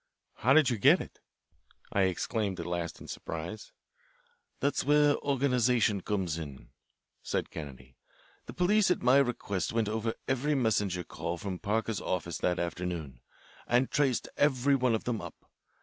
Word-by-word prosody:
"How 130 +3 +3
did 145 -4 +5
you 115 - -1
get - - +6
it?" - - -9 0.7
I 100 -1 +3
exclaimed 100 +1 -2
at - - -4
last 85 -1 -3
in - - -11
surprise. 85 +6 -6 0.9
"That's 140 +1 0
where 145 +1 +4
organisation 125 -6 +2
comes 90 -5 -2
in," 70 -4 -9 0.5
said - - -2
Kennedy. 65 -4 -9 0.5
"The - - -7
police 200 +3 +3
at 180 - +1
my 125 +2 +6
request 115 -9 0
went 115 -2 +1
over 110 +1 -2
every 135 +3 +1
messenger 105 -8 +1
call 85 +1 -5
from 95 -1 -5
Parker's 110 0 -1
office 85 -2 -3
that 90 0 +1
afternoon, 85 -7 -4 0.5
and 125 +2 +2
traced 135 -4 +1
every 140 -1 +3
one 125 -3 +3
of 110 - -3
them 120 -3 -2
up. - - -8
110 Hz, 150 wpm, -30 LUFS, 90-130 Hz, 0.9 s, get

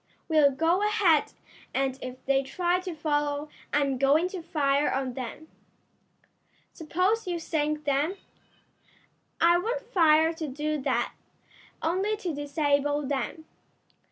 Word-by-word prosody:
"We'll 310 -3 +5
go 325 +7 +1
ahead, 415 -8 +3 0.4
and 270 0 0
if 255 0 -8
they 270 0 +3
try 350 +6 0
to 365 -2 -6
follow 295 -1 -1 0.2
I'm 275 -3 +1
going 295 +6 +3
to 370 -2 -6
fire 290 -3 +1
on 265 -1 -2
them." 260 +5 -7 1.3
"Suppose 370 +7 0
you 350 -1 -1
sink 305 -2 -1
them?" 290 +6 0 1.2
"I 345 +1 +5
won't 485 +6 -2
fire 325 -8 +4
to 320 -1 -5
do 300 +2 -2
that; - - 0 0.7
only 385 +6 0
to 360 -6 -3
disable 290 0 0
them. 285 +3 -3
305 Hz, 125 wpm, -27 LUFS, 280-345 Hz, 1.3 s, We'll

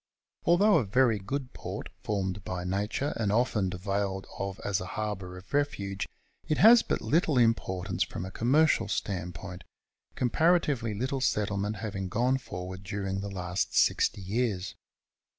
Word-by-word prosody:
Although 195 +3 +5
a - - 0
very 115 +1 +3
good 130 +6 -4
port, - - -6
formed 95 -2 -2
by 90 -1 -4
nature, 100 +9 -1
and 105 -3 0
often 105 -4 +2
availed 95 +1 -2
of 100 0 -3
as 100 -3 0
a 90 - -5
harbour 100 -4 -3
of 90 - -14
refuge, 100 -9 -1 0.4
it 155 - +1
has 230 +2 +8
but - - -2
little 155 -3 +2
importance 100 -5 +1
from 90 - -5
a 95 - -7
com 115 +5 -1
mercial 155 +2 +4
standpoint, 90 -1 -4 0.5
comparatively 135 -4 +2
little 130 +5 -2
settlement 105 -3 0
having 100 -2 -4
gone 125 +6 +1
forward 95 -5 -7
during 95 0 -3
the 100 - -4
last 90 -1 -2
sixty - - +3
years. 100 -1 -1
100 Hz, 150 wpm, -29 LUFS, 95-125 Hz, 0.5 s, has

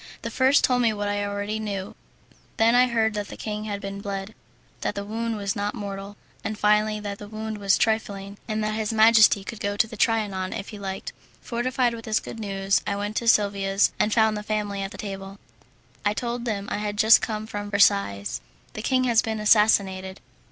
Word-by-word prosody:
The - - -4
first 265 +2 +4
told 250 -1 +3
me 230 -2 +3
what 205 -1 -3
I 205 0 -1
already 205 +1 -3
knew; 200 -3 -4 0.6
then 225 +1 +4
I 250 +1 +5
heard 225 -2 +1
that 205 -1 -3
the - - -9
king 210 0 -4
had 205 -2 -3
been 200 0 -6
bled, 200 0 -5 0.5
that - - -2
the 200 - -4
wound 225 +1 -3
was 200 -1 -2
not 205 +2 -2
mortal, 200 -1 -6 0.3
and 215 -1 -3
finally, 210 0 +2
that 205 -1 -6
the 205 - -8
wound 220 0 -5
was 200 -1 +3
trifling, 200 -3 -1
and 215 -1 -1
that 215 0 -1
his 215 0 -1
majesty 220 -2 +6
could 220 +2 -7
go 205 0 -2
to - - +4
the 225 0 -10
Trianon 205 -4 0
if 195 - -6
he 210 - -9
liked. 190 -1 -5 0.3
Fortified 245 0 0
with 225 -1 -8
this 215 -1 +1
good 225 - -9
news, 195 -2 0
I 200 - 0
went 205 +1 -4
to 235 - -2
Silvia's 200 -2 +3
and 215 - +2
found 220 -1 +3
the 210 - -3
family 210 -2 -2
at 195 - -3
table. 195 -1 -7 0.7
I 205 0 +1
told 240 0 -3
them 205 -3 -2
I - - 0
had 210 0 -3
just 220 +2 +7
come 215 -1 -3
from 205 -1 -5
Versailles. 200 - +2 0.3
"The 215 - -5
king 255 +3 +1
has 235 -3 +4
been 220 -1 -3
assassinated." 200 -3 +3
210 Hz, 210 wpm, -25 LUFS, 200-220 Hz, 0.7 s, just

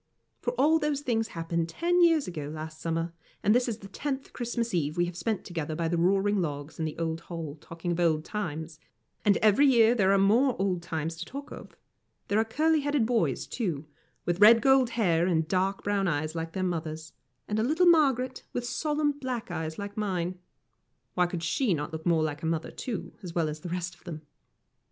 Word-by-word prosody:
For 245 - -1
all 295 +6 +4
those 300 -2 -1
things 225 -5 0
happened 165 -2 -2
ten 350 - +1
years 330 -4 +4
ago 155 -5 -5
last 155 0 -7
summer, 165 0 -2 0.3
and 210 - +5
this 245 +1 +2
is 220 - -3
the 200 - -11
tenth 270 +6 -4
Christmas 235 -1 -2
Eve 155 -2 0
we 175 - +3
have 175 0 -6
spent 215 +3 -2
together 160 -3 -4
by 165 +1 -1
the 170 +1 0
roaring 195 +3 +2
logs 145 -2 -5
in 160 - 0
the 155 - -4
old 165 0 -2
hall, 165 -4 -5
talking 165 +1 -5
of 170 - -1
old 160 -2 +2
times; 160 -6 -4 0.4
and 205 -2 +4
every 215 +7 +6
year 235 -3 +6
there 195 -5 +3
are 200 - +5
more 235 +7 +4
old 190 -3 0
times 165 -1 -3
to 175 - -5
talk 280 +2 -8
of. - - -10 0.5
There 205 - +3
are - - +4
curly 310 +8 +2
headed 290 -4 +1
boys, 230 -1 +1
too, 170 - -3 0.4
with 175 +1 0
red 225 +2 +9
gold 265 +1 +4
hair 175 -6 +3
and 160 -3 +1
dark 190 +2 0
brown 200 -1 +1
eyes 155 -1 -1
like 165 -1 -4
their 190 - -2
mother's, 160 -3 -3 0.3
and 210 +1 -1
a - - +2
little 315 +8 +3
Margaret, 270 -7 +3
with 245 - -2
solemn 295 +3 0
black 255 -7 -5
eyes 160 -2 -4
like 200 0 -6
mine. 185 -4 -2 0.7
Why 180 +5 +2
could 175 -1 -5
she 190 +4 +1
not 150 +1 -4
look 160 +2 -5
like 155 -3 +1
her 160 - -2
mother, 165 -1 -2
too, 235 -5 -5
as 175 -3 -8
well 165 -2 +2
as 150 0 -5
the 175 - -7
rest 180 0 -3
of - - -22
them? 155 -2 -7
185 Hz, 210 wpm, -28 LUFS, 165-240 Hz, 0.7 s, red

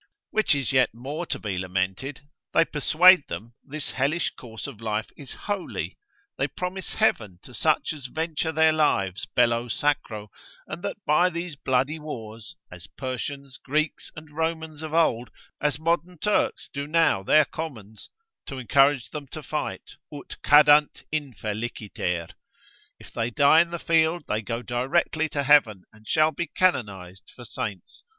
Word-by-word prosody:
Which 215 -8 +3
is 135 -2 -1
yet 130 -4 +3
more 145 +8 -5
to - - -2
be 100 -4 -3
lamented, 95 +10 -2 0.3
they 165 - +6
persuade 165 +2 +5
them 115 +2 -7
this 150 0 -5
hellish 140 +5 0
course 115 -3 -9
of 130 -7 -8
life 110 -1 -2
is 140 -4 -8
holy, 205 -3 -3 0.4
they - - +2
promise 185 +1 -5
heaven 110 - +1
to 125 - -12
such 155 +4 +1
as 140 -4 -7
venture 160 +2 -2
their 160 0 +4
lives 100 - +1
bello 120 0 +3
sacro, 110 -6 -1 0.3
and - - -7
that - - -4
by 175 +5 +4
these 170 -2 -5
bloody 135 +3 0
wars, 115 -7 -8 0.2
as 90 -2 -10
Persians, 135 +1 -6
Greeks, 155 +3 -1
and 155 -1 -11
Romans 160 -1 -2
of 155 -1 -6
old, 125 -8 +2 0.3
as 145 -1 +1
modern 170 +3 -1
Turks 210 +6 0
do 140 0 -4
now 165 -10 +3
their 150 +10 +5
commons, 110 -11 -8 0.4
to 135 - -6
encourage 135 +1 +3
them 150 -2 -6
to 155 +3 -8
fight, 150 +2 -5
ut 145 -2 -8
cadant 150 0 +5
infeliciter. 110 - -3 0.7
If - - -15
they 115 +1 -1
die 145 +6 +6
in 170 - -1
the 170 - -4
field, 165 0 +2
they 105 - -1
go 115 +2 -4
directly 135 +6 0
to 145 -1 -2
heaven, 130 -10 +4
and 110 0 -19
shall 155 0 +3
be 170 +2 -3
canonised 100 - -1
for 120 - -10
saints. 100 -5 -6
140 Hz, 155 wpm, -25 LUFS, 115-160 Hz, 0.7 s, they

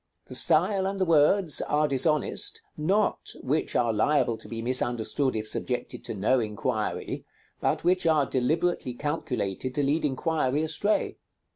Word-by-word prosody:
The - - -10
style 190 +4 +3
and 195 0 -3
the 185 - +2
words 165 0 +3
are 150 +1 +1
dishonest, 150 +2 +1
not 195 +8 0
which 150 +5 -1
are 115 -2 +2
liable 125 +2 +2
to - - -10
be 115 - -5
misunderstood 125 +1 0
if 110 0 -2
subjected 125 +3 -3
to - - -5
no 110 +6 +2
inquiry, 110 0 -3 0.4
but - - 0
which 180 -1 +2
are 155 -3 +3
deliberately 135 +1 -1
calculated 130 - -3
to 145 - +1
lead 145 +4 +1
inquiry 150 0 0
astray. 180 +7 0
145 Hz, 145 wpm, -27 LUFS, 125-160 Hz, 0.4 s, style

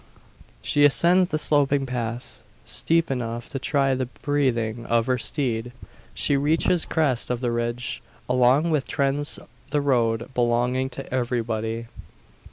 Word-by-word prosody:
She 145 - +2
ascends 175 +5 +5
the 155 - 0
sloping 145 -2 +2
path 120 -1 -5 0.2
steep 165 -2 0
enough 120 -2 -4
to 135 - -3
try 135 0 +1
the 130 -1 -2
breathing 120 -5 -1
of 115 -1 +2
her 125 0 0
steed. 120 -3 0 0.4
She 145 - +1
reaches 160 +4 +2
the - - -19
crest 140 -7 +1
of 125 -1 -1
the 120 -1 -1
ridge, 120 +1 -3 0.3
along 125 +6 +3
which 150 -3 +1
trends 140 +1 -1 0.3
the 145 +1 +1
road 120 -3 0
belonging 125 +2 +1
to 125 - -6
everybody. 115 -2 -2
130 Hz, 140 wpm, -24 LUFS, 120-145 Hz, 0.4 s, ascends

